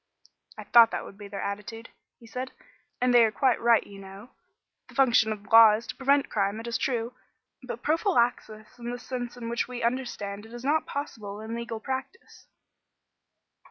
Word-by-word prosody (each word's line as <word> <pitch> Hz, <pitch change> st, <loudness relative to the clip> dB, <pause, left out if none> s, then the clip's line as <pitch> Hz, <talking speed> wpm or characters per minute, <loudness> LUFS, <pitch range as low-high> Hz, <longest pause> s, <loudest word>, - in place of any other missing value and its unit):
"I -, -, -7 dB
thought 235 Hz, -1 st, +7 dB
that -, -, -4 dB
would -, -, -11 dB
be 205 Hz, -, -8 dB
their 200 Hz, 0 st, -6 dB
attitude," 210 Hz, +3 st, -6 dB, 0.3 s
he 235 Hz, -, -17 dB
said, 255 Hz, +3 st, -6 dB, 0.5 s
"and 250 Hz, 0 st, +2 dB
they 240 Hz, -1 st, +7 dB
are 220 Hz, -, +2 dB
quite 255 Hz, +3 st, +1 dB
right, 235 Hz, -1 st, +4 dB
you 200 Hz, -1 st, -12 dB
know. 195 Hz, +5 st, -12 dB, 0.6 s
The -, -, -16 dB
function 240 Hz, -5 st, +4 dB
of 210 Hz, -1 st, -5 dB
law 225 Hz, 0 st, +8 dB
is 225 Hz, +2 st, -6 dB
to -, -, -7 dB
prevent 280 Hz, +1 st, +2 dB
crime, 200 Hz, 0 st, -1 dB
it 225 Hz, -, -8 dB
is 235 Hz, -1 st, -2 dB
true; 240 Hz, -2 st, -2 dB, 0.5 s
but 245 Hz, -2 st, -7 dB
prophylaxis 245 Hz, -, 0 dB
in 240 Hz, 0 st, -5 dB
the 245 Hz, -, -4 dB
sense 245 Hz, -1 st, -6 dB
in 235 Hz, -1 st, -6 dB
which 235 Hz, 0 st, -1 dB
we 245 Hz, -1 st, -6 dB
understand 225 Hz, -4 st, -3 dB
it 225 Hz, -, -15 dB
is 240 Hz, -, -9 dB
not 305 Hz, +3 st, +1 dB
possible 215 Hz, -8 st, -6 dB
in 220 Hz, +1 st, -7 dB
legal 235 Hz, -1 st, -5 dB
practice." 265 Hz, -, -7 dB
235 Hz, 190 wpm, -27 LUFS, 215-250 Hz, 0.6 s, law